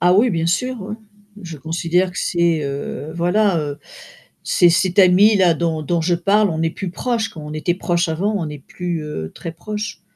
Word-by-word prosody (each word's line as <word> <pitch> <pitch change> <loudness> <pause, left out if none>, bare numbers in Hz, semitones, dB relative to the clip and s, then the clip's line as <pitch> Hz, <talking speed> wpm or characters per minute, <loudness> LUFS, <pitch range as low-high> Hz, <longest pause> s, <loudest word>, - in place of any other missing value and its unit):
Ah 180 +1 +4
oui, 230 +5 +4
bien 165 -3 0
sûr, 250 +9 0
oui, 210 +3 -5 0.5
je 165 -3 -7
considère 170 +4 0
que 180 - -8
c'est, 170 -3 +1
heu, 140 +2 -5
voilà, 180 +2 +2
heu, 145 -1 -4 0.7
c'est 175 - +4
cette 180 +2 +1
amie-là 190 -1 +6
dont 160 -1 -1
dont 170 +3 0
je 175 +2 +1
parle, 200 +4 +2
on 160 -2 -3
n'est 165 - +1
plus 190 +1 -5
proches, 225 +4 -2
quoi, 160 - -10
on 150 0 -7
était 165 +3 -1
proches 175 -2 0
avant, 195 +7 -1
on 180 -5 -1
n'est 150 -1 -7
plus, 170 +1 -5
heu, 80 - -5
très 165 - -7
proches, 210 +4 -6
175 Hz, 200 wpm, -20 LUFS, 160-195 Hz, 0.7 s, amie-là